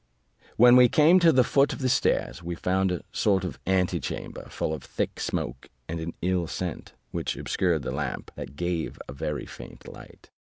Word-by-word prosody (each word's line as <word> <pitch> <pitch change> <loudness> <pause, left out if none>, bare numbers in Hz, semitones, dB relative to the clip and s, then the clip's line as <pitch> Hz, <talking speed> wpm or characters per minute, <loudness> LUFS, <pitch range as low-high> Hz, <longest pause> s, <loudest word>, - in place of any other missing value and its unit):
When 120 +1 +8
we 125 -1 +7
came 160 +5 +6
to 170 -2 +6
the 130 -4 +5
foot 140 +3 +2
of - - -6
the 130 - -1
stairs, 125 -7 +1
we 85 0 -4
found 95 +2 0
a 90 - -3
sort 95 -3 +1
of 90 - -5
antechamber, 90 -6 -1
full 80 - -2
of 75 - -6
thick - - -3
smoke 65 +2 -3 0.2
of 80 +1 -4
an 80 +1 -5
ill 90 -2 +1
scent, 90 -1 -5 0.2
which - - -2
obscured 85 -6 0
the - - -3
lamp, 70 -1 -4
that 65 - -8
gave 85 0 -2
a - - -7
very 75 +1 -4
faint - - -11
light. - - -13
90 Hz, 190 wpm, -26 LUFS, 80-120 Hz, 0.2 s, When